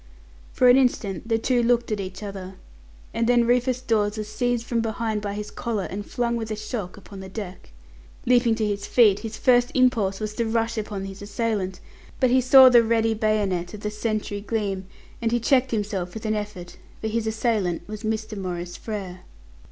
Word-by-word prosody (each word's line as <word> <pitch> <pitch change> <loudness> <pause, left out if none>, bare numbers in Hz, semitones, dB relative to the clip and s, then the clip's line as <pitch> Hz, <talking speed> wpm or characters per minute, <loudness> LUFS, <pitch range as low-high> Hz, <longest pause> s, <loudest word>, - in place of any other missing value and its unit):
For 250 - +3
an 245 +1 +8
instant 225 -7 0
the 225 - +3
two 245 +2 +1
looked 240 -1 +1
at 210 - -1
each 190 +1 -6
other, 195 -2 -7 0.6
and 230 0 0
then 240 -1 +4
Rufus 250 +1 +1
Dawes 215 -3 +1
was 215 -1 -4
seized 240 +2 -1
from 235 -1 0
behind 220 -1 -2
by 205 -1 -4
his 210 0 -6
collar, 225 -4 -3
and 200 +3 -5
flung 235 +2 -1
with 225 -1 -4
a 215 - -2
shock 215 -3 -5
upon 200 -1 -11
the 190 0 -8
deck. 190 -2 -8 0.6
Leaping 240 -2 +4
to 220 -1 -1
his 200 -1 -2
feet, 215 -5 +5
his 220 -1 -6
first 245 -1 +4
impulse 230 -7 +2
was 215 -1 -4
to 230 +2 -1
rush 230 0 0
upon 205 -3 -4
his 195 0 -9
assailant, 205 -3 -2 0.4
but 255 -2 +3
he 260 +1 +5
saw 260 +1 +8
the 245 -2 +7
ready 225 0 +2
bayonet 210 -5 0
of 205 - -10
the 210 - -3
sentry 210 -1 -3
gleam, 200 -3 -2 0.3
and 230 -1 0
he 240 - +2
checked 260 +2 +3
himself 205 -4 -3
with 220 - -7
an 215 - +1
effort, 205 -5 -6 0.2
for - - -3
his 220 0 -1
assailant 215 -6 -1
was 215 0 -7
Mr. 220 -1 -3
Maurice 175 -3 -5
Frere. 195 -5 -6
215 Hz, 200 wpm, -24 LUFS, 200-235 Hz, 0.6 s, an